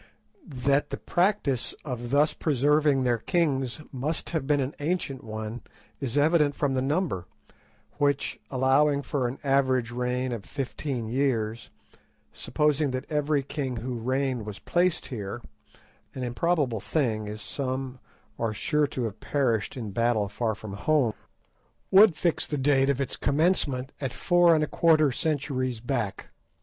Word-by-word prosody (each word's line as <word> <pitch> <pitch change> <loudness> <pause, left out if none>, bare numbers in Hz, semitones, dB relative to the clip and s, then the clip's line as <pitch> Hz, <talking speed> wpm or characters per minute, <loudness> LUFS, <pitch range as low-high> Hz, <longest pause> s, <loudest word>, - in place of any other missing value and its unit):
That 140 +1 +3
the - - -4
practice 175 - 0
of 120 -4 -4
thus 145 +3 +3
preserving 145 -1 +2
their 120 -2 +1
kings 140 - 0
must 145 +5 -3
have 155 -5 -2
been 145 -1 +3
an 135 +1 -2
ancient 145 -3 -2
one 110 +1 -5 0.4
is 135 -1 -3
evident 150 -1 +3
from 145 -2 0
the 130 - +1
number, 140 - -1 0.7
which, 145 -1 +1
allowing 140 +2 +3
for 135 -2 -1
an 125 +3 -5
average 130 -3 +2
reign 125 +1 -1
of 115 -4 -4
fifteen 135 -2 -4
years, 115 -3 -1 0.6
supposing 150 -1 +1
that 130 +1 -3
every 150 -1 +1
king 135 -2 -3
who 120 +1 -4
reigned 130 0 -1
was 105 -2 -7
placed 175 -1 0
here—an 115 +3 -9
improbable 130 -1 0
thing, 110 -4 -1
as 105 0 -6
some 130 -1 -4 0.4
are 115 -2 -1
sure 150 +6 +1
to 130 - -4
have 110 -3 -4
perished 125 -6 0
in 110 -5 -5
battle 115 0 +1
far 110 +2 -2
from 105 -1 -8
home—would 155 - +1
fix 170 +1 0
the 150 - -2
date 135 0 +3
of 140 -1 +1
its 140 - 0
commencement 145 -4 +2
at 135 -3 -2
four 175 -1 +4
and 155 - +2
a - - 0
quarter 155 -4 +4
centuries 130 -4 -1
back. 120 -4 -3
135 Hz, 145 wpm, -27 LUFS, 120-150 Hz, 0.7 s, four